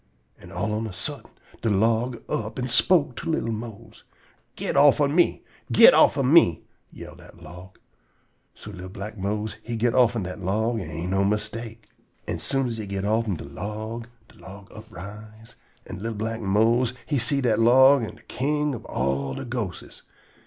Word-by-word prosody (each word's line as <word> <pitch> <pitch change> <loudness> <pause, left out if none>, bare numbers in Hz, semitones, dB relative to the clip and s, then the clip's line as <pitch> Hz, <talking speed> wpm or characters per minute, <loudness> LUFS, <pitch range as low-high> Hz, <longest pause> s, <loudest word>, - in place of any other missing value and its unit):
An' - - -14
all 100 +5 -2
on 110 +1 -2
a 100 - -8
suddent - - -7 0.2
de 115 - 0
log 115 +3 +1
up 110 0 -3
and 125 0 -2
spoke 130 +3 +3
to 170 - -5
li'l 135 -8 -1
Mose: 115 0 -8 0.5
"Get - - -3
offen 140 0 +5
me! 175 +1 +2 0.3
Get - - +8
offen 135 0 +4
me!" 90 - +5 0.3
yell - - -11
dat 85 - -16
log. 90 +4 -12 0.8
So - - -10
li'l 90 +1 -9
black 100 +3 -7
Mose 105 +2 -3
he 115 +1 -5
git 115 +1 +1
offen 120 -4 +3
dat 90 +2 -7
log, 110 +5 0
an' 85 +2 -5
no 95 +1 +2
mistake. 110 +2 -3 0.4
An' - - -4
soon 135 -1 -1
as 115 -2 -4
he 105 - -5
git 100 0 -3
offen 110 -1 0
de 80 - -8
log, 110 +9 -6 0.2
de - - -21
log 95 +1 -12
uprise, 110 +1 -11 0.3
an' 95 - -8
li'l 115 +1 -4
black 115 +2 -4
Mose 115 +5 +2
he 145 -3 0
see 140 +4 +1
dat 120 -5 +1
dat - - -1
log 130 +4 +6
am 110 - -5
de - - -20
king 150 +2 -1
ob 120 - -7
all 70 +1 -2
de - - -6
ghostes. 115 -7 -6
110 Hz, 180 wpm, -24 LUFS, 100-120 Hz, 0.8 s, Get